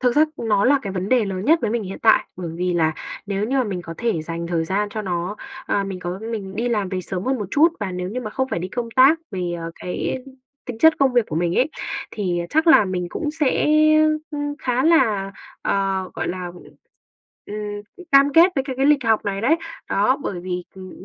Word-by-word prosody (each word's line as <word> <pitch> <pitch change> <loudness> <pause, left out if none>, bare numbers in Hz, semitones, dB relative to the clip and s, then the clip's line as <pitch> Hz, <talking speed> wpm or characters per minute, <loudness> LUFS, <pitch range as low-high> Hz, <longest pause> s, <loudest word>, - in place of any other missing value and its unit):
thực 250 0 +1
ra 305 - +7
nó 210 -3 +1
là 280 +2 +5
cái 195 - -4
vấn 185 +1 -3
đề 250 -4 +3
lớn 190 -1 -4
nhất 320 +6 +5
với 220 - -1
mình 235 0 -1
hiện 195 -1 -7
tại. 220 - +5
Bởi 180 -2 -5
vì 180 0 0
là 160 -2 +2 0.3
nếu 200 0 -1
như 265 +5 -1
mà 255 - +2
mình 190 -4 -4
có 165 -1 -8
thể 230 -10 -1
dành 170 +1 -5
thời 170 -2 -1
gian 200 +4 -1
cho 215 0 -4
nó, 180 +2 -3 0.3
ờ, 200 - 0
mình 195 -1 -5
có 180 +1 -4
mình 195 -4 -5
đi 240 +2 0
làm 210 -5 0
về 185 -1 -3
sớm 185 +1 -5
hơn 265 0 0
một 205 - -3
chút, 305 +7 +5
và 195 -3 -3
nếu 180 0 -4
như 250 +5 -4
mà 215 - -5
không 265 +4 -2
phải 215 - -2
đi 180 - -4
công 235 +3 -4
tác 275 +5 +6
về, 180 -2 -3
ờ, 165 0 -5
cái 180 +7 -3 0.5
tính 245 -4 -7
chất 320 +4 +7
công 270 -2 +3
việc 240 -3 +3
của 155 - -3
mình 170 +1 0
ấy, 270 +5 +2 0.4
thì 180 -5 -2
chắc 315 +2 +2
là 320 -10 +7
mình 180 -2 -2
cũng 300 - -3
sẽ, 300 -3 +1 0.6
ưm, 290 -1 -3
khá 250 +2 0
là, 210 -12 +3 0.3
ờ, 195 -1 0
gọi - - -3
là, 180 0 -4
ừm, 175 0 -10 1.3
ừm, 365 -2 -13
cam 275 +1 +6
kết 345 +4 +6
với 270 -3 0
cái 260 -3 -5
cái 270 - +2
lịch 290 -3 +4
học 225 -1 +2
này 195 -1 -2
đấy. 280 +8 +3 0.3
Đó, 210 +7 +3
bởi 180 -7 -4
vì, 180 -1 -4
ừm, 185 -1 -10
205 Hz, 240 wpm, -22 LUFS, 185-260 Hz, 1.3 s, ra